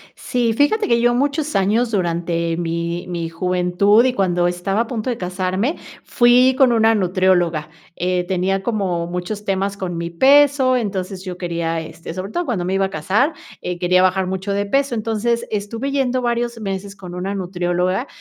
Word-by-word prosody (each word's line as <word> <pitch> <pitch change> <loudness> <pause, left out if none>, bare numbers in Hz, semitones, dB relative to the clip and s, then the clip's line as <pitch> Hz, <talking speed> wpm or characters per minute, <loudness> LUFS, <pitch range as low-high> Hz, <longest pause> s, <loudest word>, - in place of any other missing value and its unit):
Sí, 240 -2 -1
fíjate 290 - +2
que 235 -1 +3
yo 240 0 +3
muchos 285 +4 -1
años 215 +5 +2
durante 170 -3 -1
mi 170 +1 -3
mi 170 -2 -3
juventud 180 +5 +2
y 255 - +2
cuando 180 -5 +1
estaba 180 +4 -1
a 235 - +1
punto 235 0 -3
de 240 - -3
casarme, 185 - -1 0.3
fui 250 +1 +4
con 265 -3 +5
una 225 -1 +4
nutrióloga, 180 -5 +1 0.3
eh, 180 0 0
tenía 190 +1 -1
como 190 -7 -1
muchos 180 +4 -5
temas 195 0 -1
con 185 -3 -4
mi 170 0 -4
peso, 270 +5 +4
entonces 195 -4 -3
yo 180 -1 -5
quería, 170 -2 -2
este, 165 +1 -8
sobre 190 +3 -6
todo 350 - -1
cuando 205 -9 -1
me 185 +2 -1
iba 195 0 +2
a - - -7
casar, 195 - +1 0.3
eh 180 -1 -4
quería 180 +1 +3
bajar 185 0 +2
mucho 190 +2 -3
de 200 0 -1
peso. 275 +4 +1
Entonces 230 +1 -1
estuve 225 +6 -3
yendo 260 -2 0
varios 235 -1 -1
meses 195 -1 -5
con 180 -3 -9
una 190 +2 -3
nutrióloga 180 +3 -1
195 Hz, 180 wpm, -20 LUFS, 180-235 Hz, 0.3 s, con